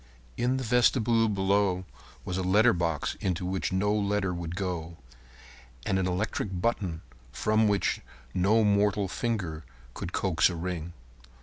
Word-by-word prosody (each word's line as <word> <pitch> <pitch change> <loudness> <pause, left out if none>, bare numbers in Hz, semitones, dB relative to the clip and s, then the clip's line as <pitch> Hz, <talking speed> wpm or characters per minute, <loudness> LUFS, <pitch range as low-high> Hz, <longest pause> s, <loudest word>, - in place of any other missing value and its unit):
In 125 +2 +1
the 130 - -3
vestibule 115 -1 +3
below 95 -2 +1 0.4
was 90 - -3
a 95 - -1
letter 105 +6 +4
box 85 -3 -1
into 90 -2 -1
which 95 +1 -2
no 100 +3 +1
letter 100 -2 0
would 85 -1 -5
go, 85 -3 -4 0.9
and 95 - +1
an 95 - 0
electric 95 0 -2
button 90 -6 -1 0.3
from 110 - +2
which 100 -1 +1 0.3
no 105 +5 +3
mortal 100 -1 +2
finger 95 -8 -3 0.3
could 85 - -6
coax 90 -3 +2
a 90 - -4
ring. 85 -1 -4
95 Hz, 140 wpm, -28 LUFS, 90-105 Hz, 0.9 s, letter